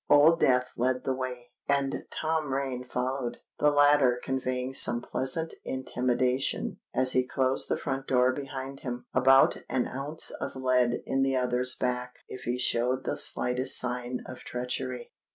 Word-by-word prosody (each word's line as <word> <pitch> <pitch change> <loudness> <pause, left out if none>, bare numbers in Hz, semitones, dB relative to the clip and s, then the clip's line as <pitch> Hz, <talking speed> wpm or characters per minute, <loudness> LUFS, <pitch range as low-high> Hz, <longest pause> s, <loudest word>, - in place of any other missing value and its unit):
Old 155 +3 +6
Death 125 -1 +2
led 125 +1 0
the 135 - 0
way, 125 -2 -6 0.2
and 140 -1 0
Tom 155 -3 -2
Rain 135 -2 -2
followed, 125 0 -3 0.2
the 150 - +4
latter 145 -4 +4
conveying 130 0 -2
some 120 -3 +5
pleasant 135 +6 -2
intimation, 130 0 -1
as 130 0 +2
he 130 - +3
closed 130 0 0
the - - +1
front 135 -1 -4
door 125 0 +3
behind 135 0 -6
him, 125 -1 -6
about 135 +1 +5
an 125 -2 0
ounce 145 +4 -1
of - - -6
lead 125 -2 +1
in 135 - 0
the 135 0 +1
other's 125 0 +1
back 125 0 -2
if 130 - -9
he 120 +1 -1
showed 125 +1 +1
the - - -2
slightest 125 +2 +2
sign 125 0 -2
of 130 - -9
treachery. 125 0 -4
130 Hz, 155 wpm, -28 LUFS, 125-135 Hz, 0.2 s, Old